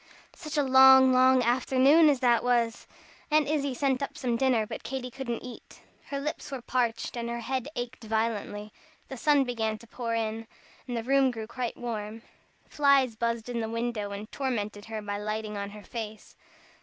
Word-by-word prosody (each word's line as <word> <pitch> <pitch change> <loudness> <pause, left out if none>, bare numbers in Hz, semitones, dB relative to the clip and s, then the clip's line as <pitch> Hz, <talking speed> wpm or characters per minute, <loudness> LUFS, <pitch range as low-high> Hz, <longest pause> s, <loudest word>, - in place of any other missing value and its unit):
Such 305 -3 -6
a 290 - +3
long, 265 0 +7
long 255 0 +5
afternoon 265 +6 +4
as 280 -3 +1
that 240 -2 +3
was! 240 -2 0 0.4
Aunt 305 -1 +3
Izzie 285 -3 -1
sent 265 0 0
up 280 +2 -4
some 245 -5 -1
dinner, 240 -3 +2
but - - -7
Katy 255 -1 -5
couldn't 240 -2 -5
eat. 250 -1 -11 0.3
Her 280 - -3
lips 300 +3 -4
were 265 -3 -5
parched 235 -2 -1
and 235 -1 -3
her 235 0 -4
head 260 +2 -3
ached 245 -1 -6
violently. 215 -1 -2 0.4
The 265 - -6
sun 290 +2 +3
began 225 -4 -2
to 235 - -15
pour 230 0 -4
in, 225 0 -3 0.4
the 240 -2 -3
room 270 +1 +3
grew 225 -3 -5 0.3
warm. 225 -2 -5 0.4
Flies 275 -5 +3
buzzed 230 0 -2
in 245 -1 -3
the 220 -1 -3
window, 230 -2 -2
and 200 +2 -7
tormented 215 -6 -3
her 220 -1 -6
by 205 0 -4
lighting 215 0 -4
on 200 0 -4
her 210 0 -11
face. 220 -2 -8
240 Hz, 180 wpm, -28 LUFS, 220-265 Hz, 0.4 s, long